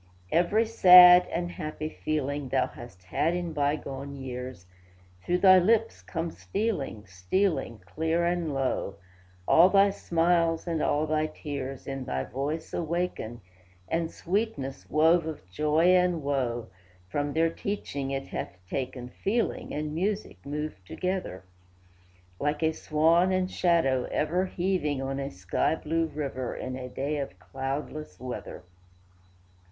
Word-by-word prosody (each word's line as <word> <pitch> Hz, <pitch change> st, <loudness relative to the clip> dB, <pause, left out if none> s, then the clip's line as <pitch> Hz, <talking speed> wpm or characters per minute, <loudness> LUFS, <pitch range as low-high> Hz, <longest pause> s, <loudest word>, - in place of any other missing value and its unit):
Every 190 Hz, +7 st, +3 dB
sad 180 Hz, -4 st, +9 dB
and 175 Hz, +1 st, -3 dB
happy 155 Hz, -2 st, -5 dB
feeling, 145 Hz, -3 st, -3 dB
Thou -, -, +2 dB
hast 95 Hz, -7 st, -12 dB
had 155 Hz, -, 0 dB
in 175 Hz, -2 st, -3 dB
bygone 140 Hz, -1 st, -2 dB
years, 125 Hz, -7 st, -7 dB, 0.6 s
Through 175 Hz, -, 0 dB
thy 185 Hz, 0 st, +7 dB
lips 225 Hz, +4 st, +2 dB
come 165 Hz, -1 st, -4 dB
stealing, 190 Hz, -, -3 dB
stealing, 110 Hz, -, -1 dB
Clear 160 Hz, -, 0 dB
and 170 Hz, -2 st, 0 dB
low; 135 Hz, -7 st, -1 dB, 0.5 s
All 170 Hz, +3 st, +7 dB
thy 200 Hz, +1 st, +5 dB
smiles 165 Hz, -2 st, +1 dB
and 165 Hz, -3 st, -1 dB
all 150 Hz, +1 st, +1 dB
thy 155 Hz, 0 st, 0 dB
tears 135 Hz, -4 st, -6 dB
In 135 Hz, -1 st, -5 dB
thy 65 Hz, -, -2 dB
voice 145 Hz, -, -4 dB
awaken, 170 Hz, -9 st, -3 dB, 0.5 s
And 165 Hz, -, -1 dB
sweetness, 175 Hz, -9 st, -3 dB
wove 160 Hz, +2 st, +4 dB
of 150 Hz, -, -7 dB
joy 155 Hz, -, +2 dB
and 180 Hz, -3 st, +3 dB
woe, 125 Hz, -5 st, -1 dB, 0.4 s
From 145 Hz, +7 st, -2 dB
their 165 Hz, +1 st, +2 dB
teaching 145 Hz, -9 st, -4 dB
it 135 Hz, 0 st, -3 dB
hath 95 Hz, -, -5 dB
taken 125 Hz, +1 st, -4 dB
Feeling 225 Hz, -, -2 dB
and 150 Hz, 0 st, -3 dB
music 200 Hz, +6 st, -2 dB
move 150 Hz, -8 st, -5 dB
together, 180 Hz, -, -4 dB, 1.0 s
Like 150 Hz, +2 st, -1 dB
a 160 Hz, -, +3 dB
swan 165 Hz, +4 st, +3 dB
and 185 Hz, 0 st, 0 dB
shadow 150 Hz, -8 st, +2 dB
ever 180 Hz, +5 st, 0 dB
Heaving 175 Hz, -7 st, -1 dB
on 135 Hz, +1 st, -3 dB
a 135 Hz, 0 st, -3 dB
sky 90 Hz, -, 0 dB
blue 165 Hz, +1 st, -1 dB
river 140 Hz, -5 st, -4 dB
In 130 Hz, 0 st, -5 dB
a 130 Hz, -1 st, -6 dB
day 140 Hz, +4 st, -2 dB
of 140 Hz, -, -5 dB
cloudless 135 Hz, -3 st, -5 dB
weather. 125 Hz, -6 st, -7 dB
155 Hz, 135 wpm, -28 LUFS, 135-175 Hz, 1.0 s, sad